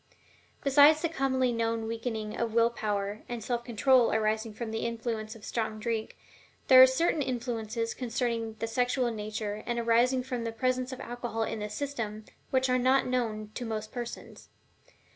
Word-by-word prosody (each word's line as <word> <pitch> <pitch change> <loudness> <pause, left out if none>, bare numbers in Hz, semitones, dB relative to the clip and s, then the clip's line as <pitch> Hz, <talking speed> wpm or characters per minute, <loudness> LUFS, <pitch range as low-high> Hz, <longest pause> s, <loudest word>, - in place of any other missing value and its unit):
Besides 290 +3 +6
the 335 - +1
commonly 260 -4 +1
known 230 -1 -1
weakening 225 -1 -4
of 230 -1 -2
will 230 0 +4
power 205 -2 -2
and 240 -2 -4
self 240 0 -2
control 240 +1 +3
arising 220 0 0
from 225 -1 -5
the 225 - -2
influence 225 -2 -3
of 220 - -12
strong 220 -2 -2
drink, 225 0 -3 0.5
there 260 -1 +10
are 260 - +11
certain 300 +4 +1
influences 230 -3 -2
concerning 230 -2 -2
the 225 - -2
sexual 245 +1 0
nature 215 -1 -4
and 240 -1 -1
arising 240 +2 +3
from 250 -2 -4
the 230 - -2
presence 255 +2 -1
of 260 - -7
alcohol 240 -2 -3
in 220 - -3
the 210 0 -4
system, 220 -6 -4 0.2
which 260 0 +2
are 255 0 +2
not 260 +2 +3
known 220 -4 -2
to 250 - -5
most 215 -2 -4
persons. 240 -1 -7
235 Hz, 170 wpm, -29 LUFS, 220-255 Hz, 0.5 s, are